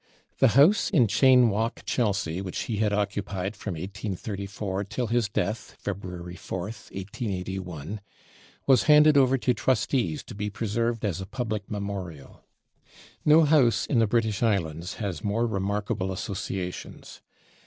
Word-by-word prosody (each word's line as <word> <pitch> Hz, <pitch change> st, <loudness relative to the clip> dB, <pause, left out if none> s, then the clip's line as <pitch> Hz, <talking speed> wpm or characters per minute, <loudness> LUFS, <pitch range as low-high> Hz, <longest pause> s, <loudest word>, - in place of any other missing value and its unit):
The 130 Hz, -1 st, +4 dB
house 185 Hz, +10 st, +5 dB
in 125 Hz, -6 st, +4 dB
Cheyne 125 Hz, +2 st, +5 dB
Walk, 110 Hz, +3 st, -2 dB
Chelsea, 100 Hz, -7 st, 0 dB
which 95 Hz, -2 st, -4 dB
he 110 Hz, -, -3 dB
had 105 Hz, 0 st, +1 dB
occupied 100 Hz, -1 st, -2 dB
from 100 Hz, -2 st, -5 dB
1834 100 Hz, +2 st, -4 dB
till 120 Hz, +5 st, -3 dB
his 115 Hz, -1 st, 0 dB
death 105 Hz, +1 st, -3 dB
(February 90 Hz, -3 st, -6 dB
4th, 95 Hz, +4 st, -6 dB
1881), 95 Hz, -, -5 dB, 0.6 s
was 130 Hz, -5 st, +5 dB
handed 150 Hz, 0 st, +7 dB
over 135 Hz, -1 st, +5 dB
to 125 Hz, 0 st, +1 dB
trustees 115 Hz, -, 0 dB
to -, -, -10 dB
be 105 Hz, +1 st, -3 dB
preserved 115 Hz, +2 st, -1 dB
as 95 Hz, -3 st, -2 dB
a 95 Hz, -, -6 dB
public 110 Hz, -2 st, -4 dB
memorial. 100 Hz, -8 st, -6 dB, 0.8 s
No 155 Hz, +2 st, +6 dB
house 135 Hz, -8 st, +4 dB
in 125 Hz, -, +1 dB
the 115 Hz, -, +3 dB
British 110 Hz, -2 st, 0 dB
islands 85 Hz, -6 st, 0 dB
has 100 Hz, -7 st, -4 dB
more 110 Hz, +3 st, +1 dB
remarkable 100 Hz, -1 st, -2 dB
associations. 95 Hz, -2 st, -5 dB
105 Hz, 135 wpm, -26 LUFS, 95-115 Hz, 0.8 s, handed